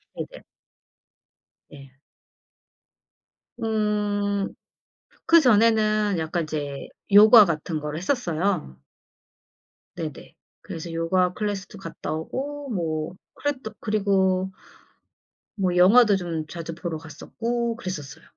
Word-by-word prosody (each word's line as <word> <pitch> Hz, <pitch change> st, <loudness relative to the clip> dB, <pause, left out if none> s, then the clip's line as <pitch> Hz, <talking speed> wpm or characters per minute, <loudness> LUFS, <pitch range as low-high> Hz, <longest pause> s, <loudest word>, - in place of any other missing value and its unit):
네 -, -, -4 dB
네. -, -, -12 dB, 1.3 s
네. 135 Hz, -3 st, -13 dB, 1.7 s
음 210 Hz, -2 st, 0 dB, 0.8 s
그전에는 215 Hz, -, +4 dB
약간 165 Hz, +2 st, -2 dB
이제 145 Hz, -3 st, -5 dB, 0.2 s
요가 215 Hz, +2 st, +9 dB
같은 160 Hz, -1 st, -2 dB
거를 150 Hz, 0 st, -5 dB
했었어요. 180 Hz, -, -1 dB, 1.2 s
네네. 160 Hz, -5 st, -7 dB, 0.3 s
그래서 165 Hz, +1 st, -7 dB
요가 180 Hz, +2 st, +1 dB
클래스도 205 Hz, 0 st, -4 dB
갔다 165 Hz, -5 st, -7 dB
오고 275 Hz, -, -5 dB
뭐 165 Hz, -5 st, -3 dB, 0.2 s
그래 290 Hz, 0 st, -1 dB
또 220 Hz, -, -6 dB
그리고 190 Hz, -3 st, +1 dB, 1.0 s
뭐 185 Hz, -4 st, 0 dB
영화도 205 Hz, +4 st, +6 dB
좀 165 Hz, -4 st, -4 dB
자주 165 Hz, 0 st, -6 dB
보러 170 Hz, -1 st, -4 dB
갔었고 230 Hz, +10 st, -4 dB
그랬었어요. 185 Hz, -, -7 dB
190 Hz, 200 characters per minute, -24 LUFS, 165-215 Hz, 1.7 s, 요가